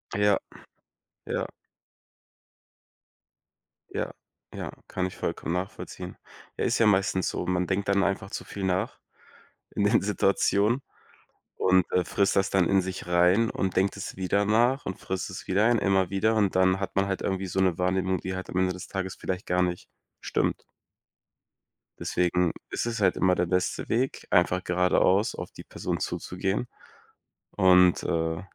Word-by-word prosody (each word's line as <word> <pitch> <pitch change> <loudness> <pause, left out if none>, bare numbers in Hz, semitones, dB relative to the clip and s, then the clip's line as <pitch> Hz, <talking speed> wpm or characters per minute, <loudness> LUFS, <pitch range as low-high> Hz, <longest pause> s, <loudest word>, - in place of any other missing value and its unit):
Ja, 105 -1 +4 0.9
ja. - - -2 2.4
Ja, - - -3 0.4
ja, - - -5 0.2
kann 90 -1 -2
ich 95 - -5
vollkommen 85 - -3
nachvollziehen. 90 +2 -5 0.4
Ja, - - 0
ist - - +1
ja 115 - +5
meistens 95 -2 +2
so, - - -3
man 90 -1 0
denkt 100 +1 -1
dann 100 0 +3
einfach 100 0 -1
zu - - -5
viel 100 - -6
nach 95 0 -1 0.7
in 100 - -1
den 115 +3 +4
Situationen 105 +4 +2 0.7
und, 95 -1 +3
äh, 90 - +2
frisst 100 +2 +1
das 95 0 +2
dann 95 -3 +3
in 95 -1 +4
sich 95 -1 -6
rein 90 +6 +4
und 95 -2 -2
denkt 95 +1 +2
es 100 - -6
wieder 100 +2 +1
nach 120 +6 +2
und 95 - -5
frisst 95 0 -4
es 95 - -8
wieder 100 +3 +3
rein, 120 -2 +3
immer 95 -2 +2
wieder. 110 +3 +1
Und 100 -4 +2
dann 95 +1 +3
hat 95 -1 -4
man 100 0 +2
halt 95 - -2
irgendwie 95 0 -2
so 95 - -2
'ne 90 -3 +2
Wahrnehmung, 95 +1 +1
die 95 0 -4
halt 95 - -6
am 90 - -4
Ende 95 0 +2
des 90 - -8
Tages 95 -1 -4
vielleicht 95 0 -4
gar 90 0 +1
nicht 90 -1 -2 0.3
stimmt. - - -1 1.3
Deswegen 90 -1 +1 0.2
ist - - -2
es 115 -2 -3
halt 95 -2 +3
immer 90 -1 +3
der 90 - +1
beste 90 +1 -1
Weg, 125 +4 -1
einfach 90 +1 +3
geradeaus 90 +3 +2
auf - - -7
die - - -11
Person - - -4
zuzugehen 95 +6 -2 0.8
und, 90 -1 +5
äh, 80 0 -1
95 Hz, 165 wpm, -27 LUFS, 90-100 Hz, 2.4 s, ja